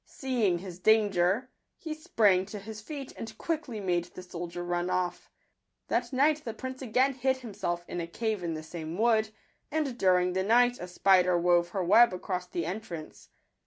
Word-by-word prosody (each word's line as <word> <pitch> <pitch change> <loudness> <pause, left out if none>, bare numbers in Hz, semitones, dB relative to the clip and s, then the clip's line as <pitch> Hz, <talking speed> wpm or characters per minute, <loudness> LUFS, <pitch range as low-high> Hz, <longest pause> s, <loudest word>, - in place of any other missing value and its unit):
Seeing 235 -9 0
his 180 0 -9
danger, 205 +3 +3 0.3
he 320 -2 -5
sprang 205 -11 +2
to 210 - -7
his 215 +1 -8
feet, 275 +3 -7
and 220 -1 -8
quickly 305 -9 -3
made 175 -3 0
the 180 +1 -11
soldier 175 -1 -6
run 175 0 -1
off. 180 -1 -2 0.6
That - - 0
night 295 +3 +2
the 230 -2 -5
prince 260 +2 -6
again 260 +2 +2
hid 260 +1 0
himself 175 -8 -4
in 175 - -4
a 165 - -4
cave 215 +2 -2
in 165 -2 -2
the 155 - -6
same 160 +1 -6
wood; 220 -1 +3 0.4
and 295 -4 -1
during 180 -1 +3
the 190 - +1
night 245 +4 +3
a 180 - -6
spider 180 0 +4
wove 175 0 +3
her 190 +1 -2
web 220 +5 +6
across 180 0 -4
the 175 -2 -3
entrance. 175 -4 -7
195 Hz, 180 wpm, -29 LUFS, 175-240 Hz, 0.6 s, web